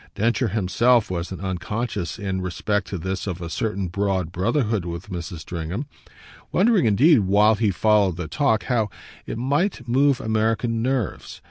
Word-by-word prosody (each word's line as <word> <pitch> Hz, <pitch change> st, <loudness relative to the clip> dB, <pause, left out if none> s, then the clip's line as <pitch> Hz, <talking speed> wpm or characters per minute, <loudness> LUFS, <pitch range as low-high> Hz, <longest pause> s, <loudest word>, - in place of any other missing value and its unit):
Densher 120 Hz, +3 st, +1 dB
himself 110 Hz, +3 st, +2 dB
wasn't 90 Hz, +1 st, -4 dB
unconscious 95 Hz, +2 st, -3 dB
in 95 Hz, -3 st, -3 dB
respect 90 Hz, +2 st, -2 dB
to 95 Hz, -, -4 dB
this 95 Hz, +4 st, -4 dB
of 90 Hz, -2 st, -3 dB
a 85 Hz, -1 st, -6 dB
certain 100 Hz, -3 st, -2 dB
broad 95 Hz, -2 st, -1 dB
brotherhood 110 Hz, -, 0 dB
with 85 Hz, +3 st, -6 dB
Mrs. 85 Hz, -2 st, -5 dB
Stringham; 85 Hz, -, -4 dB, 0.7 s
wondering 205 Hz, -, +3 dB
indeed, 135 Hz, +8 st, +5 dB
while 105 Hz, +2 st, +4 dB
he 110 Hz, 0 st, +1 dB
followed 100 Hz, -2 st, +2 dB
the 90 Hz, -3 st, -4 dB
talk, 110 Hz, -, +1 dB
how 115 Hz, -4 st, 0 dB, 0.4 s
it -, -, -4 dB
might 140 Hz, -, 0 dB
move 135 Hz, +2 st, +3 dB
American 110 Hz, 0 st, 0 dB
nerves. 125 Hz, -3 st, -2 dB
105 Hz, 150 wpm, -23 LUFS, 95-120 Hz, 0.7 s, indeed